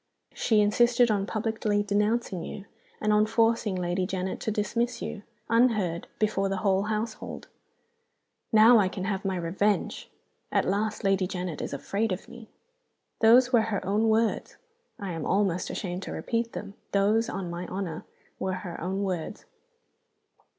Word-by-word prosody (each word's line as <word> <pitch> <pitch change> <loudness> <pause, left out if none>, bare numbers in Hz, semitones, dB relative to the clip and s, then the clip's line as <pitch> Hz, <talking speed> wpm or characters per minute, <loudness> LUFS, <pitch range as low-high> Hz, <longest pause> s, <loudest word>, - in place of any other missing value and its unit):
She 220 -3 +2
insisted 240 +3 +4
on 200 -1 0
publicly 215 -2 0
denouncing 210 -1 0
you, 200 - -7 0.3
and 215 0 +2
on 210 +1 +4
forcing 225 -2 +2
Lady 180 0 -1
Janet 190 -1 -3
to - - -3
dismiss 230 +3 -1
you, 205 - -5 0.3
unheard, 215 -8 +2
before 195 -2 +1
the 195 - -1
whole 195 0 +3
household! 220 +1 -4 1.0
'Now 225 +1 +7
I 190 -3 +2
can 185 0 -5
have 195 0 -2
my 195 -1 -1
revenge! 190 +4 -1 0.4
At - - +2
last 210 +3 -1
Lady 195 -1 +2
Janet 180 -3 -4
is - - -4
afraid 200 +10 -2
of 185 - -4
me!' 235 -2 -12 0.7
Those 245 +3 +6
were 235 - +6
her 200 -3 -2
own 210 +4 +2
words 220 +1 +1 0.4
I 195 -2 -4
am 165 -2 -4
almost 190 -3 +1
ashamed 180 -2 -4
to - - -6
repeat 230 0 -2
them 200 -1 -6 0.2
those, 210 +3 +3
on 180 -3 -4
my 175 +1 -5
honor, 185 -4 -4 0.4
were 190 - -1
her 175 -2 -6
own 190 +4 -2
words! 185 +1 -4
205 Hz, 155 wpm, -27 LUFS, 190-220 Hz, 1.0 s, Now